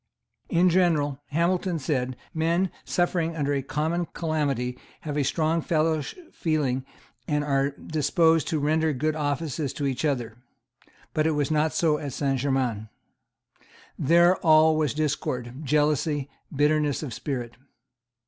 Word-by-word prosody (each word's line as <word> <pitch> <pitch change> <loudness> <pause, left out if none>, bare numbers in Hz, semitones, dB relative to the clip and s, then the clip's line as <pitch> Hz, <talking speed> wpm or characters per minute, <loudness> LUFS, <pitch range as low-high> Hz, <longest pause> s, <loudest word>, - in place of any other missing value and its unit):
In 175 +1 +4
general, 155 -6 +2
Hamilton 175 +3 0
said, 130 -3 -2 0.2
men 170 +3 +1
suffering 175 -2 0
under 145 -2 0
a 140 - 0
common 160 +5 -1
calamity 140 -7 -1 0.2
have 150 -2 -4
a 145 - +1
strong 160 +4 +1
fellow 155 -1 +1 0.3
feeling 140 -5 -1 0.4
and 150 -1 0
are 140 -1 +1
disposed 160 +2 +1
to 160 - 0
render 155 +1 +1
good 155 +4 -1
offices 145 -1 -2
to 145 - -3
each 135 0 -2
other. 120 -7 -1 0.8
But 155 0 +2
it 160 - +2
was 145 +1 0
not 155 0 +2
so 155 -3 +1
at 140 -3 -5
Saint 135 -2 0
Germains. 125 -5 -1 1.1
There 170 +4 +5
all 155 -1 +5
was 150 -3 0
discord, 135 -5 -2
jealousy, 145 0 +1 0.2
bitterness 150 0 +1
of 130 -6 -5
spirit. 120 0 -4
150 Hz, 135 wpm, -26 LUFS, 140-160 Hz, 1.1 s, There